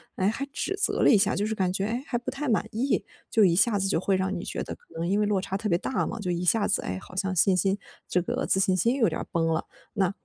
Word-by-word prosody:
诶， 190 - +1
还 230 +6 -1
指 390 +6 -2
责 - - +1
了 - - +6
一 - - +7
下， 195 - +3
就 205 - 0
是 220 - -1
感 185 -3 0
觉， 195 +1 -1
诶， 240 +5 -2
还 240 - -1
不 245 +2 -5
太 275 0 -3
满 220 - +1
意。 245 +5 0 0.2
就 215 -3 +4
一 170 -2 +3
下 205 +2 +4
子 195 0 0
就 165 - +1
会 195 +1 +1
让 190 +1 -1
你 175 - -5
觉 - - -4
得 - - -6
可 - - -15 0.2
能 170 +1 -2
因 200 +3 +1
为 210 - +2
落 200 -2 +1
差 190 0 -4
特 210 +2 -2
别 170 - +3
大 260 - -2
嘛， 230 - -5
就 185 -4 -2
一 175 +1 -2
下 205 +4 +3
子， - - +1
诶， 90 - -4
好 185 - -14
像 190 0 -1
信 185 +2 +5
心 195 +3 +1 0.3
这 180 - +1
个 240 +9 -2
自 190 - +3
信 190 -1 +3
心 230 +8 +2
有 230 -5 +3
点 - - -3
儿 - - -8
崩 165 -1 +1
了。 160 0 -1 0.3
那 195 -3 +1
195 Hz, 335 characters per minute, -26 LUFS, 185-225 Hz, 0.3 s, 一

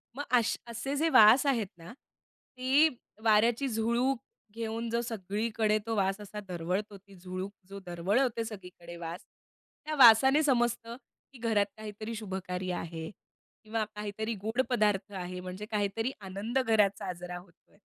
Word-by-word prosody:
मग 290 - -3 0.2
अश 225 - 0
असे 270 +5 -4
जे 320 +3 +2
वास 225 +3 +7
आहेत 230 -7 +1
ना, 170 +7 -11 0.6
ती 270 +5 +4 0.3
वाऱ्याची 230 +5 +4
झुळूक 235 +3 0 0.3
घेऊन 230 0 -3
जो 235 +1 0
सगळीकडे 215 0 -1
तो 225 -1 -1
वास 195 0 +1
असा 205 +1 -7
दरवळतो 185 +4 -3
ती 195 0 -18
झुळूक 185 +2 -6 0.2
जो 200 0 -7
दरवळवते 220 +8 0
सगळीकडे 180 -5 -9
वास, 170 +1 -7 0.6
त्या 310 0 -2
वासाने 265 +5 +8
समजतं, 240 -3 +1 0.4
की 250 - -13
घरात 220 -3 +2
काहीतरी 215 +1 -6
शुभकार्य 185 -3 -4
आहे. 165 -2 -5 0.5
किंवा 220 0 -1
काहीतरी 210 +2 -3
गोड 220 +6 -1
पदार्थ 210 -4 +1
आहे 180 0 -5
म्हणजे 185 +3 -6
काहीतरी 215 +4 0
आनंद 200 +7 -2
घरात 210 -3 +4
साजरा 180 0 -5
होत 175 -1 -14 0.2
आहे. - - -25
215 Hz, 145 wpm, -30 LUFS, 190-235 Hz, 0.6 s, वासाने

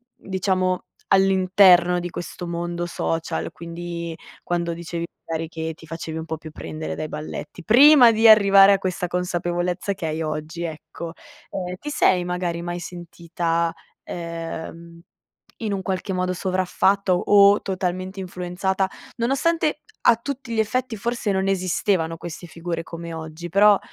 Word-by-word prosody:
diciamo 185 -1 -1 0.3
all'interno 185 -2 +5
di 175 0 -4
questo 175 +1 -6
mondo 175 0 -3
social, 165 - -2
quindi 170 0 -6 0.3
quando 170 -1 -1
dicevi 170 0 -5 0.2
magari 165 0 -3
che 160 0 -5
ti 160 - -15
facevi 160 0 -5
un 160 - -6
po' 160 -1 -4
più 155 0 -10
prendere 155 +1 -6
dai 155 - -4
balletti, 150 +2 -7
prima 255 - +8
di 225 +1 +4
arrivare 200 -2 +8
a - - +3
questa 185 -1 -2
consapevolezza 175 +1 -1
che 185 -3 -6
hai 155 +1 -2
oggi, 155 +1 -4
ecco, 160 +1 -7 0.4
ehm, 180 -1 -4
ti 295 - -6
sei 185 -10 +3
magari 180 -1 -2
mai 175 0 -4
sentita, 170 -1 -2 0.3
ehm, 170 0 -7 0.6
in 215 -2 -1
un 195 - -3
qualche 190 0 -2
modo 185 0 0
sovraffatta 185 +1 +1
o 200 +2 +5
totalmente 185 0 -3
influenzata, 190 +1 -2 0.3
nonostante 300 +5 +1 0.2
a 230 - +6
tutti 255 0 -5
gli - - -2
effetti 230 +2 0
forse 230 0 -1
non 190 0 0
esistevano 185 -2 0
queste 175 +1 -8
figure 165 0 -4
come 170 0 -8
oggi? 160 +1 -7
Però 200 +2 +6
180 Hz, 145 wpm, -23 LUFS, 170-195 Hz, 0.6 s, prima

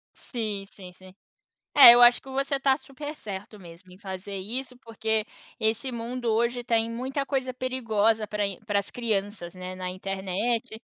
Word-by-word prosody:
Sim, 215 -5 -4
sim, 185 -4 -11
sim. 185 +1 -16 0.6
É, 255 -4 +11
eu 245 - +6
acho 240 0 +7
que 270 - -15
você 275 +1 -1
tá 270 -1 +3
super 290 +2 -8
certo 205 -3 -8
mesmo, 175 +1 -14
em 185 - -15
fazer 195 0 -7
isso, 250 +6 -4
porque 220 -2 -1 0.3
esse 230 +3 -1
mundo 240 +1 -5
hoje, 235 +2 0
tem 230 -2 +1
muita 260 +4 -3
coisa 260 -2 -2
perigosa 225 -4 +1
pra 210 0 -2
in 195 -2 -5
pras 200 -2 -1
crianças, 205 -6 -3
né, 185 0 -7
na 185 0 -4
internet 195 +5 -2
225 Hz, 165 wpm, -26 LUFS, 195-250 Hz, 0.6 s, É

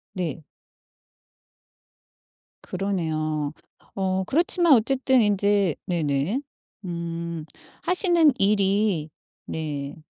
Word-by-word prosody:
네. 170 -3 -4 2.2
그러네요. 155 -6 -2 0.4
어 190 -1 -1
그렇지만 345 0 +3
어쨌든 260 +2 +2
인제 200 -3 +2
네네. 160 - -1 0.4
음. 170 -2 -5 0.4
하시는 345 -5 +5
일이 195 -5 +1 0.4
네 145 -3 -5
190 Hz, 145 characters per minute, -24 LUFS, 160-215 Hz, 2.2 s, 하시는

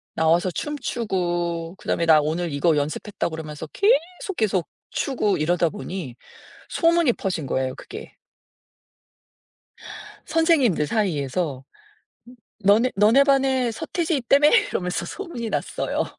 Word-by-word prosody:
나와서 165 +3 +2
춤추고 175 - -3
그다음에 170 - -1
"나 160 -2 +6
오늘 160 +2 -2
이거 155 +3 +2
연습했다." 155 +7 -2
그러면서 155 -1 -7
계속, 370 - 0
계속 190 -6 0 0.2
추고 230 -7 0
이러다 170 +2 +1
보니 180 - -6 0.5
소문이 335 -6 +3
퍼진 180 -7 -3
거예요, 130 0 -2
그게. 435 +2 -10 2.1
선생님들 305 - +2
사이에서 150 - -1 1.0
"너네 220 +6 +4
너네 225 +7 +5
반에 265 -3 +2
서태지 330 +8 -2
있다며?" 275 +3 +4 0.2
이러면서 180 0 -2
소문이 295 - -6
났어요. - - -2
195 Hz, 275 characters per minute, -23 LUFS, 160-270 Hz, 2.1 s, 나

